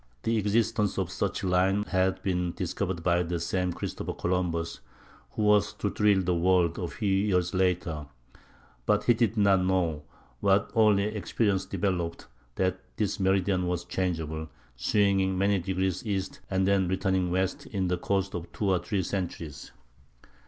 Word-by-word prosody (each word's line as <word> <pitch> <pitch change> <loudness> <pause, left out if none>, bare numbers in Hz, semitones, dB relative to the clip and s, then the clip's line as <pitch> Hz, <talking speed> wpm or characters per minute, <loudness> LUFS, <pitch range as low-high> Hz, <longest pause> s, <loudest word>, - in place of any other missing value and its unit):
The 115 - +1
existence 110 0 +1
of 95 -2 -1
such 100 +1 -2
a - - 0
line 95 +3 +2
had 95 -2 0
been 90 -2 0
discovered 90 -1 -3
by 85 0 +3
the 85 0 -2
same 90 +2 -1
Christopher - - -4
Columbus 85 -2 -1 0.5
who 110 - -1
was 105 0 +4
to 105 -1 -2
thrill 105 -3 +3
the 90 0 +1
world 85 -1 +2
a 90 - -2
few 105 - -4
years 95 -3 +1
later; 90 -5 0 0.8
but 105 0 +3
he 120 - +5
did 115 -1 0
not 100 -2 +4
know, 90 -5 +1 0.4
what 100 0 +2
only 105 -3 +4
experience 105 -1 0
developed, 85 -4 -2 0.3
that 95 0 0 0.2
this 100 -2 -1
meridian 95 -1 +2
was 90 -1 -2
changeable, 80 -4 -2 0.3
swinging 95 - +2
many 100 +1 +2
degrees 95 0 -1
east 100 -4 -3
and 95 0 +1
then 100 -2 +3
returning 95 0 0
west 95 +1 -1
in 95 -4 -1
the 90 0 0
course 100 +1 0
of 85 -1 -6
two 100 -2 0
or 90 - +3
three 100 0 -2
centuries. 85 -6 -5
95 Hz, 160 wpm, -28 LUFS, 90-100 Hz, 0.8 s, he